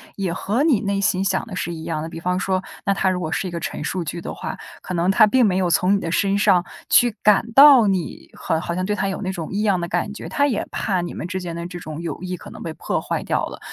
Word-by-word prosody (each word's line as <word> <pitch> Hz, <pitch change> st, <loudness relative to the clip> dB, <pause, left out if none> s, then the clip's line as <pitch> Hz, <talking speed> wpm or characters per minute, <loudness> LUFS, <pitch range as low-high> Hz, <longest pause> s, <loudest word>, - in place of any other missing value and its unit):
也 190 Hz, -3 st, -2 dB
和 215 Hz, +9 st, -1 dB
你 295 Hz, -9 st, +3 dB
内 200 Hz, -1 st, -1 dB
心 190 Hz, -1 st, +1 dB
想 190 Hz, +2 st, 0 dB
的 200 Hz, -6 st, -7 dB
是 170 Hz, -, -3 dB
一 160 Hz, -1 st, -7 dB
样 160 Hz, -2 st, -3 dB
的。 160 Hz, -, -4 dB
比 165 Hz, 0 st, -8 dB
方 180 Hz, +1 st, 0 dB
说， 185 Hz, 0 st, -1 dB, 0.2 s
那 200 Hz, -, +3 dB
他 195 Hz, -1 st, +1 dB
如 185 Hz, -1 st, -1 dB
果 160 Hz, -3 st, -3 dB
是 -, -, -1 dB
一 -, -, -9 dB
个 170 Hz, -, -4 dB
陈 155 Hz, -, -5 dB
述 180 Hz, +3 st, -2 dB
句 170 Hz, +2 st, -5 dB
的 -, -, -6 dB
话， -, -, -6 dB, 0.2 s
可 185 Hz, -, -6 dB
能 175 Hz, +2 st, +2 dB
他 215 Hz, +2 st, +6 dB
并 250 Hz, +3 st, +4 dB
没 185 Hz, -3 st, +2 dB
有 185 Hz, -2 st, +1 dB
从 180 Hz, +3 st, +3 dB
你 200 Hz, -, +2 dB
的 165 Hz, -, -4 dB
身 195 Hz, +4 st, +1 dB
上 180 Hz, -3 st, +3 dB, 0.2 s
去 240 Hz, -2 st, +5 dB
感 210 Hz, +2 st, +3 dB
到 270 Hz, -3 st, +8 dB
你 185 Hz, -4 st, -2 dB
好 160 Hz, -, -1 dB
好 170 Hz, -, -3 dB
像 185 Hz, +1 st, -2 dB
对 210 Hz, +2 st, -1 dB
他 195 Hz, -1 st, -1 dB
有 190 Hz, -, -4 dB
那 185 Hz, -, -3 dB
种 165 Hz, -4 st, -6 dB
异 200 Hz, +2 st, -1 dB
样 195 Hz, -4 st, +2 dB
的 170 Hz, -, -4 dB
感 205 Hz, -, -1 dB
觉， -, -, -8 dB
他 285 Hz, 0 st, +2 dB
也 245 Hz, -7 st, -1 dB
怕 190 Hz, -4 st, -1 dB
你 175 Hz, -, -5 dB
们 -, -, -5 dB
之 185 Hz, +1 st, -4 dB
间 175 Hz, -2 st, -5 dB
的 170 Hz, +1 st, -5 dB
这 180 Hz, 0 st, -8 dB
种 155 Hz, -1 st, -7 dB
友 170 Hz, -, -4 dB
谊 180 Hz, -1 st, -4 dB
可 -, -, -11 dB
能 -, -, -10 dB
被 165 Hz, -, -4 dB
破 -, -, -3 dB
坏 -, -, -2 dB
掉 -, -, 0 dB
了， -, -, -9 dB
185 Hz, 320 characters per minute, -22 LUFS, 170-200 Hz, 0.2 s, 到